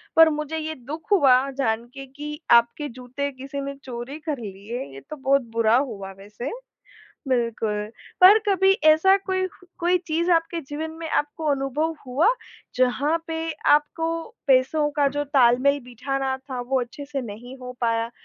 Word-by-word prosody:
पर 325 0 +8
मुझे 305 +1 -3
ये 315 0 -4
दुःख 295 - -9
हुआ 270 -10 +6 0.2
जान 225 -3 0
के 275 -1 -8
कि 295 +3 -8
आपके 235 +5 +4
जूते 255 +4 -5
किसी 275 +2 -6
ने 280 0 -5
चोरी 250 +3 -6
कर 305 -3 -3
लिए, 205 +3 -6
ये 135 - -9
तो 305 - -5
बहुत 275 0 +2
बुरा 230 0 +3
हुआ 210 -8 -3
वैसे, 210 +6 -7 0.8
बिल्कुल, 225 -4 0 0.3
पर 395 +4 +9
कभी 385 0 +4 0.2
ऐसा 380 +5 +5
कोई 375 -1 -1 0.3
कोई 355 +1 +2
चीज़ 335 +3 0
आपके 330 0 +1
जीवन 305 +3 -5
में 325 - -4
आपको 295 +2 -1
अनुभव 285 +4 -1
हुआ, 275 - +3 0.5
जहाँ 265 +5 +2
पे 325 0 -3 0.2
आपको 325 +3 +2 0.3
पैसों 275 +3 +3
का 285 -1 +3
जो 290 +1 -2
तालमेल 275 0 +3
बिठाना 265 +2 -2
था, 260 -1 -7
वो 255 +1 0
अच्छे 260 +4 -7
से 280 -1 -4
नहीं 240 +4 -9
हो 250 0 -8
पाया? 230 0 0
275 Hz, 160 wpm, -24 LUFS, 245-315 Hz, 0.8 s, पर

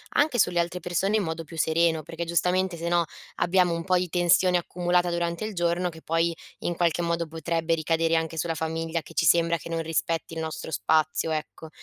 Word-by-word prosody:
anche 290 -4 +3
sulle 175 -3 +3
altre 170 +1 -1
persone 180 +4 0
in 205 - 0
modo 165 0 -4
più 165 - -11
sereno, 160 0 +2
perché 165 +3 -5
giustamente, 180 +2 +1
se 170 +1 -3
no, 175 -1 +2 0.3
abbiamo 180 -1 +2
un 165 +1 -4
po' 185 -1 +2
di 180 -1 -1
tensione 180 +1 +4
accumulata 175 0 0
durante 170 +3 -2
il 215 - -5
giorno 175 0 0
che 160 -1 -12
poi 165 +1 0 0.2
in 175 - -2
qualche 170 0 +1
modo 170 0 0
potrebbe 165 +1 -1
ricadere 165 +1 +1
anche 160 0 -2
sulla 165 +1 -1
famiglia, 165 +1 -2
che 165 - -14
ci 165 - +1
sembra 170 +1 +4
che 170 - -10
non 165 0 -1
rispetti 165 0 -2
il 160 - -4
nostro 160 0 -5
spazio, 155 0 +1
ecco. 155 +1 -5
170 Hz, 210 wpm, -26 LUFS, 165-175 Hz, 0.3 s, tensione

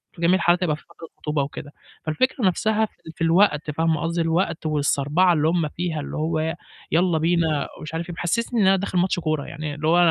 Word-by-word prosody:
في 170 - -11
جميع 175 +2 +4
الحالات 175 -1 +2
هيبقى 155 -4 +1
في 155 - -15
فترة 170 -1 -13
خطوبة 150 -2 -1
وكده. 145 +1 -7 0.3
فالفكرة 245 - 0
نَفْسها 220 +4 +1
في - - -16 0.2
في 165 - -3
الوقت 165 -3 +3
فاهمة 160 0 0
قصدي، 170 +1 -1
الوقت 165 0 0
والصَربَعة 150 +4 +2
اللي 155 -1 +2
هُم 165 -2 +1
فيها، 170 -2 -3
اللي 145 - -6
هو 160 +1 0
ي 160 +1 -1 0.4
يالّا 170 0 +3
بينا 160 -2 +1
ومش 155 0 -8
عارف 170 +2 -4
إيه، 175 - -5
بيحسّسني 230 +7 0
إن 190 - +4
أنا 195 - +6
داخل 190 -1 -2
ماتش 180 0 +1
كورة، 155 -3 -1
يعني 150 0 -5
اللي 155 +2 -3
هو 170 - +4
165 Hz, 220 wpm, -23 LUFS, 155-180 Hz, 0.4 s, أنا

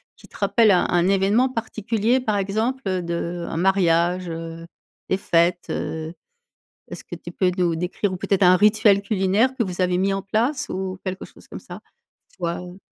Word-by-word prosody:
qui - - -18
te - - -20
rappelle 225 -3 +3
un 180 - +3
un 175 +1 +2
événement 200 +6 +3
particulier, 230 0 -1
par 215 -5 -1
exemple, 220 +7 -1
heu, 185 -2 -1
de 170 0 -3
un 165 - -4
mariage, 180 -1 +2
heu, 165 0 -7 0.4
des 190 - +2
fêtes, 175 -1 +1
heu, 160 +1 -4 0.8
est-ce - - -8
que - - -8
tu - - -10
peux 185 -2 +1
nous 175 -2 +1
décrire 180 +3 -2
ou - - -3
peut-être 195 +1 0
un 180 0 +7
rituel 210 0 +4
culinaire 205 +6 +1
que - - +1
vous 185 -3 -4
avez 180 -1 +2
mis 195 +1 +1
en 195 - -1
place 230 +8 -1
ou 185 0 -4
quelque 185 0 -4
chose - - -17
comme - - -8
ça? - - -10 0.6
Soit 170 -2 -3
heu 180 +1 -10
190 Hz, 190 wpm, -22 LUFS, 175-210 Hz, 0.8 s, un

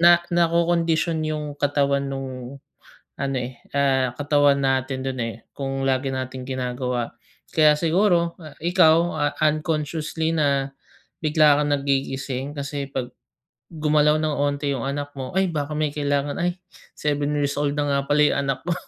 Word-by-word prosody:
na 175 0 +7
nakokondisyon 170 -1 +2
yung 150 -1 -3
katawan 140 -1 +1
nung 135 0 -6 0.6
ano, 135 -1 -1
eh, 125 0 -6 0.2
ah, 130 -3 +2
katawan 145 -1 +3
natin 130 0 0
do'n, 130 -1 -3
eh, 115 -1 -4 0.2
kung 135 -1 -3
lagi 135 0 +1
nating 130 0 -5
ginagawa. 125 -2 -2 0.4
Kaya 155 -1 +5
siguro 170 +1 +2 0.3
ikaw 170 -2 +5 0.2
a 145 - +1 0.2
unconsciously 155 +1 -1
na 140 -3 +1 0.5
bigla 150 -2 +4
kang 145 0 0
nagigising 135 0 -2
kasi 140 0 -4
pag, 125 -2 -3 0.6
gumalaw 150 -1 +2
ng 155 -1 0
konti 145 0 0
yung 130 - -3
anak 145 +2 -3
mo, 130 -2 -6
"Ay, 190 - +4
baka 150 -3 -3
may 150 -1 0
kailangan. 145 +1 -1
Ay, 175 +1 0 0.4
7 145 0 0
years 140 -1 0
old 145 0 -1
na 145 - +1
nga 140 -1 +1
pala 150 +1 +4
yung 145 - +2
anak 130 -1 -2
ko." 175 - +1
145 Hz, 150 wpm, -23 LUFS, 135-155 Hz, 0.6 s, na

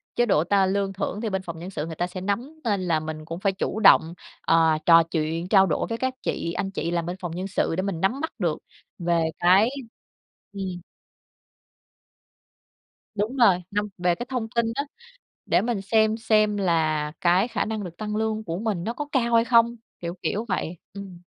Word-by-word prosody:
chế 240 - +3
độ 165 -7 +3
ta 195 +1 +3
lương 195 0 0
thưởng 200 +2 -3
thì 225 - -2
bên 190 -1 -2
phòng 170 -2 -7
nhân 180 +3 -7
sự 155 -5 -4
người 165 -1 -7
ta 175 +2 -1
sẽ 185 0 -7
nắm, 245 +11 -3
nên 205 -5 0
là 165 -3 +1
mình 155 0 -6
cũng 165 +2 -6
phải 195 0 +1
chủ 210 +2 -3
động, 170 -5 +6 0.3
à, 160 -1 +3
trò 165 -1 +7
chuyện, 165 +1 -2
trao 195 -1 +5
đổi 160 - 0
với 230 - -2
các 260 +1 -1
chị 170 - -2
anh 195 - -3
chị 170 -3 -3
làm 170 -1 -1
bên 175 +1 -4
phòng 175 -2 -4
nhân 185 +3 -4
sự 175 -3 0
để 185 - 0
mình 190 -4 -3
nắm 245 +9 +1
bắt 320 - -3
được 170 -5 0 0.4
về 170 -1 +1 0.2
cái 190 +6 +5 0.8
ừm. 185 -3 -5 2.3
Đúng 210 +5 -2
rồi, 195 -8 +4
năm 205 +1 -1
về 175 0 +2
cái 240 +8 -6
thông 245 -4 -3
tin 235 -1 +2
á, 280 - -1 0.6
để - - +3
mình 230 -4 -1
xem 220 +2 +2
xem 215 -2 +2
là 155 -5 +1
cái 185 +6 +3
khả - - -1
năng 215 -2 -3
được 170 -1 -8
tăng 210 0 -4
lương 220 0 -1
của 165 0 -4
mình 200 -5 -2
nó 230 - -2
có 295 +2 -4
cao 235 -3 +1
hay 230 0 +5
không, 235 0 +4 0.2
kiểu, 170 0 -4
kiểu 215 +3 -1
vậy. 175 -2 -2 0.2
Ừm. 190 -3 -9
195 Hz, 210 wpm, -25 LUFS, 170-220 Hz, 2.3 s, trò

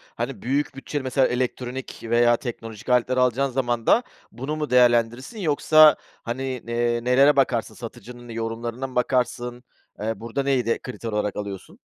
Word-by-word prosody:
hani, - - -4
büyük 140 +4 -1
bütçeli 135 +1 -4
mesela 130 0 +2
elektronik 125 +1 -3
veya 120 +1 +3
teknolojik 115 -3 -7
aletler 125 +1 +2
alacağın 125 +2 +2
zaman 120 -3 -1
da 240 - +5 0.3
bunu 135 +6 -4
mu 150 -1 -3
değerlendirirsin? 120 - +2
Yoksa, 155 -2 +6 0.3
hani, 120 +3 -4 0.2
eee, 120 0 0
nelere 135 +4 +5
bakarsın? 125 -4 +1
Satıcının 120 +1 -10
yorumlarına 115 +3 -4
mı 130 - -13
bakarsın? 125 -1 -1 0.4
Eee, 110 +2 -3
burada 115 +5 -3
neyi 135 -4 +1
de 115 - 0
kriter 120 -3 -7
olarak 105 -1 -1
alıyorsun? 100 -2 -7
125 Hz, 150 wpm, -24 LUFS, 115-135 Hz, 0.4 s, Yoksa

